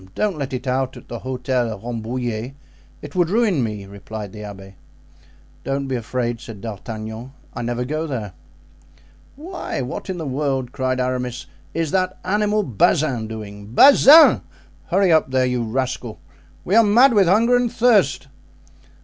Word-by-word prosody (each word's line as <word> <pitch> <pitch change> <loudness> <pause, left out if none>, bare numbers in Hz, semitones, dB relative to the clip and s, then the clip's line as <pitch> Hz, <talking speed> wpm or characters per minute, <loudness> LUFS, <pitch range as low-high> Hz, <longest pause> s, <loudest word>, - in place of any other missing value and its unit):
Don't 210 -3 0
let 135 -2 -3
it 130 0 -5
out 130 0 -1
at 125 - -15
the 120 - -5
Hotel 125 -4 -2
Rambouillet; 120 +2 -4 0.5
it 150 - -9
would 175 -2 +2
ruin 205 - +2
me," 105 -3 -4
replied 100 +1 -8
the 105 - -9
abbé. 95 -2 -9 0.9
"Don't 135 0 -2
be 135 -1 -2
afraid," 120 0 -3
said 115 -4 -9
D'Artagnan. 110 +3 -7 0.2
"I - - -5
never 120 +1 -2
go 155 +4 -3
there." 110 -9 -5 1.0
"Why, 335 - -6
what 125 +9 -6
in 185 - -3
the 160 - -5
world," 135 -2 -2
cried 130 -1 -2
Aramis, 125 -1 -2 0.3
"is 165 -3 -1
that 185 -1 0
animal 210 +2 +1
Bazin 125 - +1
doing? 105 -2 -8
Bazin! 285 - +8 0.5
Hurry 195 -2 +2
up 160 -4 +3
there, 130 -1 +2
you 125 -1 -1
rascal; 125 -1 -3 0.5
we 185 - -2
are 230 +1 +7
mad 235 +5 +5
with 200 -4 +4
hunger 230 +7 +4
and 245 -2 +1
thirst!" 215 - +2
130 Hz, 155 wpm, -21 LUFS, 115-180 Hz, 1.0 s, Bazin